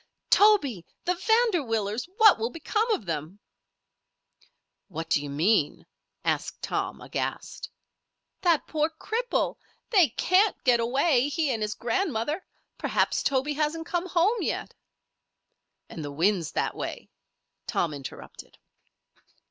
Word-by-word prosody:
"Toby, 290 - +5 0.2
the 360 - +2
Vanderwillers! 325 - +1
What 435 - +7
will 225 +2 -1
become 425 - -1
of 335 - 0
them?" 165 +3 -4 1.5
"What 165 -3 -6
d'you 145 0 +1
mean?" 155 +3 +1 0.4
asked - - -1
Tom, - - -2
aghast. - - -4 0.7
"That 340 -5 +3
poor 310 0 0
cripple! 450 +9 -2 0.3
They 370 - +5
can't 385 +3 +3
get 245 -2 +4
away, 265 +3 +2
he 305 -2 0
and 225 - -3
his 210 0 -2
grandmother. 295 - -1 0.4
Perhaps - - +1
Toby 275 +2 0
hasn't 310 +2 -1
come 350 +1 -2
home 380 +8 +2
yet." - - -3 1.1
"And 160 - -7
the 145 - -5
wind's 170 +2 +1
that - - 0
way," - - -6 0.6
Tom 165 -3 0
interrupted. 140 -2 -10
280 Hz, 115 wpm, -27 LUFS, -, 1.5 s, What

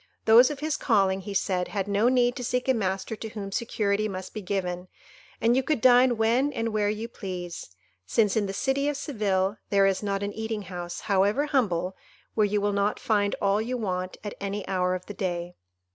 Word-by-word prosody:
Those 235 +3 +7
of 295 -2 -6
his 310 0 -1
calling, 195 -5 +2
he 200 +1 -6
said, 185 -2 0
had 200 -2 -3
no 205 +4 +3
need 245 -1 +3
to 250 - -4
seek 250 +2 -1
a 260 - +4
master 195 -1 -2
to 220 - -6
whom 205 -2 -6
security 210 -1 0
must 185 -2 -6
be 215 - -5
given, 180 -2 -3 0.5
and 230 +2 +3
you 265 - +3
could 285 0 0
dine 245 0 +5
when 235 +6 +2
and 230 -3 -1
where 210 -1 +1
you 215 +2 -3
please, 180 - -7 0.3
since, 210 - +2
in 210 -2 +1
the - - -3
city 270 +7 0
of 295 - -2
Seville, 205 -8 0
there 200 -1 +4
is 195 -1 +1
not 200 -1 -2
an 200 0 -3
eating 220 -1 -4
house, 175 -2 -6
however 205 +7 +2
humble, 190 - 0 0.4
where 215 -2 +3
you 205 +1 0
will 205 0 0
not 200 +1 0
find 205 -2 +1
all 200 +1 +2
you 250 +3 -2
want 185 -4 -3
at 205 - -5
any 200 0 -4
hour 185 -1 +1
of 185 - -7
the 205 - -7
day. 175 -3 -3
205 Hz, 210 wpm, -26 LUFS, 190-230 Hz, 0.5 s, Those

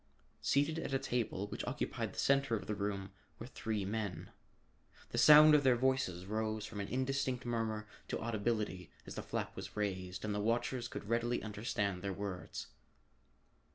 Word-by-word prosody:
Seated 145 +3 +2
at 135 - -2
a - - +5
table 120 -6 -1
which 105 - -5
occupied - - -2
the - - -14
center 135 -3 +3
of 105 - -4
the 105 - -2
room 100 -1 -3 0.3
were 115 - -7
three 110 -5 -3
men. 100 -4 -3 0.8
The - - -1
sound 150 0 +10
of 150 -1 +6
their 130 -2 +5
voices 120 -8 +1
rose 110 +1 -2
from 105 -1 -6
an 100 - -2
indistinct 130 0 -1
murmur 110 -2 -1 0.2
to - - -2
audibility 110 -5 -1 0.2
as - - -7
the - - -4
flap - - -3
was - - -7
raised 95 -2 -2
and 105 - -1
the 105 - -1
watchers 120 +3 0
could 105 - -7
readily 120 +2 0
understand 105 -3 -2
their 100 0 -2
words. 95 -2 -5
110 Hz, 170 wpm, -35 LUFS, 100-125 Hz, 0.8 s, sound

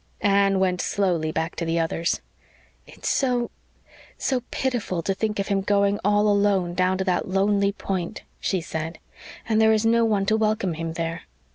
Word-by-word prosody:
Anne 200 -1 +3
went 185 -1 +1
slowly 175 -6 0
back 160 +1 -2
to - - -3
the 165 0 0
others. 165 +1 -1 0.7
"It's - - -8
so 245 -3 +1 0.7
so 260 -2 0
pitiful 235 -10 -2
to 195 - 0
think 210 +2 -2
of 200 +1 -2
him 195 -1 +1
going 200 0 +2
all 205 +1 +3
alone 200 -4 +2
down 185 +1 +1
to 190 - -1
that 180 -2 0
lonely 200 +1 +2
Point," 190 -1 -4 0.2
she 190 -3 -1
said. 160 0 -5 0.5
"And 220 -1 +3
there 220 0 +5
is 215 0 +1
no 230 +1 +4
one 210 -3 +1
to 220 +2 +2
welcome 215 -4 0
him 165 0 -4
there." 165 0 -4
195 Hz, 175 wpm, -24 LUFS, 175-210 Hz, 0.7 s, there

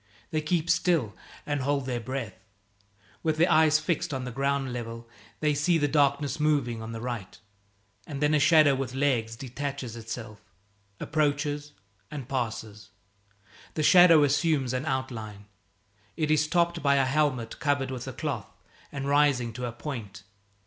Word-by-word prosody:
They 155 - 0
keep 160 +1 0
still 170 - +2 0.3
and 145 -2 -1
hold 140 0 0
their 125 -2 -2
breath. 120 -2 -4 0.9
With 160 -2 0
their 170 +3 +3
eyes 155 -1 +5
fixed 165 -1 -2
on 130 - -3
the 125 - -5
ground 135 0 -1
level, 115 -1 -6 0.3
they 150 -1 +2
see 165 +4 +2
the 145 -2 +1
darkness 145 0 +1
moving 140 -7 +1
on 110 +1 -6
the 115 - -5
right, 120 -5 -5 0.7
and 145 -4 -5
then 150 +1 +2
a 150 - +4
shadow 155 -1 +6
with 130 -1 -3
legs 125 -5 0
detaches 135 0 -5
itself, 110 -2 -7 0.6
approaches, 145 -1 -1 0.4
and 140 -5 -7
passes. 110 -5 -4 0.9
The 155 - 0
shadow 170 -2 +7
assumes 145 -2 +1
an 130 +4 -2
outline. 115 -7 -4 0.7
It 155 -2 0
is 155 0 +3
topped 170 0 +1
by 140 -1 +3
a 135 -1 +3
helmet 130 -5 0
covered 140 -2 0
with 125 -2 -6
a - - -5
cloth - - -4 0.4
and 140 -1 -4
rising 140 -5 +2
to 125 +2 -4
a - - -4
point. 115 -6 -7
140 Hz, 155 wpm, -27 LUFS, 120-150 Hz, 0.9 s, shadow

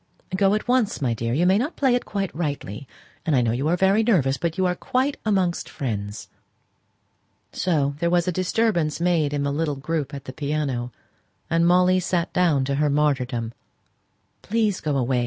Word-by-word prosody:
"Go 195 +1 +3
at 215 - -3
once, 245 -4 +1
my 130 -5 0
dear. 115 +1 -3
You 170 +4 +2
may 190 +3 +4
not 290 +8 -2
play 265 -3 +2
it 245 - 0
quite 195 -3 -3
rightly; 140 - -4 0.4
and 160 - +1
I 125 - +4
know 115 -2 +1
you 130 +6 -1
are 175 +2 +2
very 195 +4 +3
nervous; 170 - +2
but 165 +2 -3
you're 185 -1 +2
quite 260 +9 -1
amongst 185 -4 0
friends." 105 -6 -4 1.3
So 150 -6 0
there 170 - +1
was 175 0 +2
a - - +2
disturbance 180 -3 0
made 170 -4 +1
in 145 -1 -1
the 140 0 -1
little 150 -1 -1
group 145 0 -3
at 140 0 -9
the 130 - -7
piano, 140 -5 -2 0.6
and 165 +1 +3
Molly 180 +1 +4
sate 175 -1 -1
down 160 -7 +2
to 140 +1 -1
her 150 - +3
martyrdom. 130 -6 0 0.9
"Please, 215 -2 0
go 150 -3 -1
away!" 125 -1 +1
160 Hz, 185 wpm, -23 LUFS, 140-185 Hz, 1.3 s, may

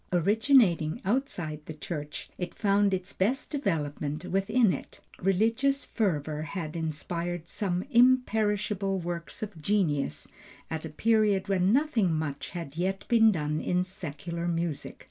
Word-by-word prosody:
Originating 200 - +3
outside 190 - -1
the 155 - -6
church, 150 -1 -6
it 180 -1 -5
found 200 -1 +3
its 185 -1 -3
best 240 +9 0
development 155 - -2
within 205 +3 +2
it. - - -7 0.2
Religious 225 +9 +2
fervor 155 -8 -1
had 155 0 -5
inspired 170 +2 -3
some 180 -1 -1
imperishable 210 -5 +3
works 170 +3 -5
of 200 -7 -7
genius 150 - 0 0.4
at 160 0 -3
a - - -9
period 210 +2 +2
when 190 0 +3
nothing 250 - +2
much 155 -3 -2
had 165 -5 -6
yet 190 +3 -2
been 225 -2 +6
done 150 -4 -1
in 180 0 +1
secular 170 -1 -5
music. 165 -3 -2
180 Hz, 130 wpm, -28 LUFS, 160-215 Hz, 0.4 s, been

